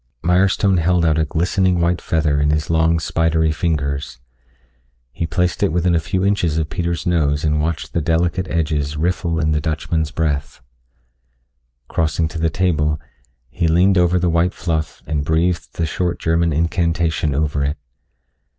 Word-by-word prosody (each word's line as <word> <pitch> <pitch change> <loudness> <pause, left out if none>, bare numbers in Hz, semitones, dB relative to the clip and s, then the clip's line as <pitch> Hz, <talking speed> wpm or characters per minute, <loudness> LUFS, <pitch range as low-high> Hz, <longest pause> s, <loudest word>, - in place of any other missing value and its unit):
Mirestone 95 +2 +3
held 85 0 +2
out 80 0 +2
a 80 - +2
glistening 90 +3 +1
white 85 0 +1
feather 75 -3 0
in 75 - +2
his 75 +1 0
long 80 0 +2
spidery 80 0 +1
fingers. 75 -5 -2 0.9
He 80 +5 -3
placed 90 0 -1
it - - +2
within 90 +1 +1
a 85 - +3
few 90 +4 -1
inches 90 -6 +1
of 80 -1 -2
Peter's 85 0 -2
nose 75 -5 +1
and 75 -1 +1
watched 80 +1 -3
the 85 - 0
delicate 85 +3 0
edges 75 -3 -1
riffle 85 0 -1
in 80 -1 +1
the 75 0 +1
Dutchman's 80 0 -1
breath. 75 -3 -2 1.3
Crossing 80 0 0
to 80 - -6
the 80 0 +1
table, 75 -3 0 0.5
he 85 +7 0
leaned 90 +4 +4
over 90 +1 +3
the 90 0 +1
white 85 +2 +1
fluff 80 -2 -3
and 75 -2 -2
breathed 80 +1 0
the 85 - -1
short 85 +2 -2
German 85 0 +1
incantation 85 -1 0
over 75 -1 0
it. 70 +3 -1
80 Hz, 160 wpm, -19 LUFS, 75-85 Hz, 1.3 s, leaned